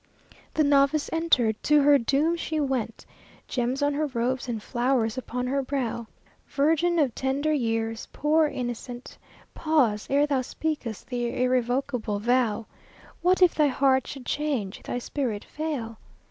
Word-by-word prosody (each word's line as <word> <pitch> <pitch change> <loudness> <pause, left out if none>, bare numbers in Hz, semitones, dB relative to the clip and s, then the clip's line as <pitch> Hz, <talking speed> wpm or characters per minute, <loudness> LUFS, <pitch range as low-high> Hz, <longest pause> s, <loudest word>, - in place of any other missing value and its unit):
The 310 - +3
novice 285 +1 +3
entered: 255 -10 +2
to 300 -1 +4
her 285 0 +6
doom 285 +7 +1
she 320 -2 -3
went, 265 -6 -2 0.4
Gems 255 +3 -1
on 290 0 +2
her 300 +1 0
robes, 250 0 -2
and 235 - -1
flowers 240 0 0
upon 250 -1 -4
her 275 +2 0
brow. 255 -4 -3 0.4
Virgin 325 +4 +2
of 280 -7 +2
tender 275 +5 0
years, 225 -4 -1
poor 305 +2 +2
innocent! 245 -1 -6 0.4
Pause, 260 -10 +1
ere 285 +2 +3
thou 280 -3 0
speak 310 +4 -3
th' 230 +2 -8
irrevocable 245 -1 0
vow. 230 -1 +1 0.6
What 365 +2 +4
if 355 - +5
thy 300 -2 +3
heart 265 -1 +2
should 270 -3 -8
change, 265 -11 -2
thy - - -4
spirit 245 -4 -3
fail? 270 -8 -4
265 Hz, 145 wpm, -26 LUFS, 240-295 Hz, 0.6 s, her